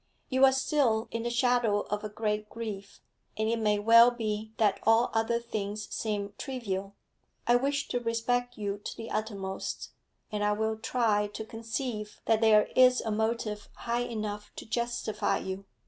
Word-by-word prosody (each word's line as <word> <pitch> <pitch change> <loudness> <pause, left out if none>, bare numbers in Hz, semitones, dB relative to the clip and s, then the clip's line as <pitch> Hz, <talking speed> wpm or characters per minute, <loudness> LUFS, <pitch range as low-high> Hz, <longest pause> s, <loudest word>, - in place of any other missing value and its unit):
'You 260 0 +5
are 265 - +6
still 265 -4 +1
in 230 - -2
the 240 - -1
shadow 240 -3 +2
of 210 +1 -4
a 215 - -3
great 210 0 -2
grief, 210 -3 -7 0.4
and 220 0 0
it 230 +1 +1
may 210 -1 +2
well 230 +3 +7
be 220 -2 -3
that 205 -3 +2
all 225 +2 +4
other 225 +1 +1
things 210 -2 -4
seem 205 -2 -2
trivial. 200 -7 -4 0.5
I 240 - +5
wish 280 +3 +1
to 245 - 0
respect 245 +1 -1
you 205 -1 -3
to - - -7
the 225 0 -7
uttermost, 200 -3 -4 0.4
and 210 -1 -1
I 210 0 +3
will 220 +1 -1
try 220 -3 +1
to 210 +1 -7
conceive 225 -1 -4
that 225 0 +3
there 215 -2 +6
is 255 0 +6
a 220 - -3
motive 220 -1 -1
high 235 0 -2
enough 210 -2 -5
to - - -8
justify 235 -2 -1
you. 190 +1 -5
220 Hz, 170 wpm, -29 LUFS, 210-235 Hz, 0.5 s, well